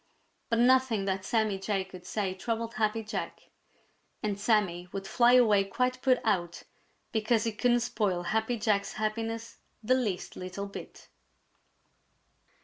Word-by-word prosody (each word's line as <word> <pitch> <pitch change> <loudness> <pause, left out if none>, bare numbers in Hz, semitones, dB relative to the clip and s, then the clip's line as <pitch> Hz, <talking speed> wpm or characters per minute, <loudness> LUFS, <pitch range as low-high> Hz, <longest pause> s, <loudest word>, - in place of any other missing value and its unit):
But 230 - +2
nothing 245 -4 +4
that 190 -1 -1
Sammy 215 -2 0
Jay 195 0 -1
could 185 -1 -12
say 200 -3 -1
troubled 230 +4 -3
Happy 220 0 0
Jack; 215 - -6 0.7
and 205 -2 -1
Sammy 195 -5 +1
would 195 -1 -5
fly 240 +4 +4
away 215 -6 +5
quite 255 +5 -1
put 255 -2 +3
out 175 -6 -1 0.5
because 220 0 +1
he 230 - 0
couldn't 240 +2 +2
spoil 205 -7 -1
Happy 220 +5 0
Jack's 210 -2 0
happiness 225 +1 -3 0.3
the 245 +4 +3
least 220 -8 -1
little 185 +2 -5
bit. 200 - -10
215 Hz, 140 wpm, -29 LUFS, 195-235 Hz, 0.7 s, away